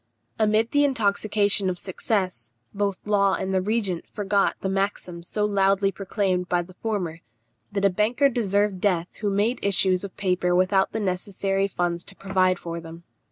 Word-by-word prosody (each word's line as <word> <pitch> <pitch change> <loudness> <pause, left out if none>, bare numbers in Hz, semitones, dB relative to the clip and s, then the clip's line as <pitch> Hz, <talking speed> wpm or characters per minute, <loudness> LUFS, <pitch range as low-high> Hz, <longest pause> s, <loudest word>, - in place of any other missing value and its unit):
Amid 215 +1 +2
the 290 0 +4
intoxication 205 -5 +2
of 180 - -3
success, 185 - -2 0.2
both 200 -1 -2
Law 200 -2 +3
and 190 0 -3
the 190 - +2
regent 200 -4 -1
forgot 200 -1 +1
the - - -1
maxim 190 -3 -2
so 210 +4 -2
loudly 195 -1 +2
proclaimed 190 -2 -1
by 175 -1 +1
the 185 +2 -15
former, 180 -6 -3 0.5
that 200 0 0
a - - +6
banker 225 +9 +2
deserved 205 -6 0
death 180 -4 0
who 210 - -1
made 205 +5 0
issues 190 -1 +2
of 200 - -8
paper 180 -2 +1
without 190 +1 +3
the 220 - -2
necessary 195 0 -1
funds 175 -3 -2
to 195 - -13
provide 185 -2 +1
for 170 -1 -6
them. 165 +1 -11
195 Hz, 165 wpm, -25 LUFS, 185-205 Hz, 0.5 s, a